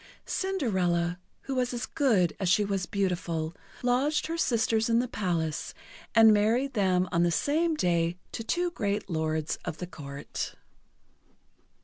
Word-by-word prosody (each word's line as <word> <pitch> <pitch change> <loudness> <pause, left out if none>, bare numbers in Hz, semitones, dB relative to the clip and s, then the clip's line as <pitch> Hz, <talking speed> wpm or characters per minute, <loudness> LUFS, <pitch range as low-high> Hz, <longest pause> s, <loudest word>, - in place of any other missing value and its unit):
Cinderella, 185 - 0 0.2
who 270 - -4
was 250 -1 0
as 235 -2 -2
good 220 - +2
as 190 -3 0
she 205 +4 +4
was 195 -2 -2
beautiful, 175 -4 -1 0.3
lodged 265 +5 +2
her 330 - -3
sisters 225 -7 +1
in 230 - +4
the 245 +1 +1
palace, 165 -8 -2 0.4
and 225 -1 +8
married 230 +6 +2
them 185 -4 +2
on 170 - +2
the 175 - +4
same 315 - +1
day 170 - +1
to 225 - -5
two 350 +8 0
great 205 - -2
lords 155 -1 -1
of 155 - -4
the 180 - -4
Court. 140 -5 -6
200 Hz, 145 wpm, -28 LUFS, 170-250 Hz, 0.4 s, and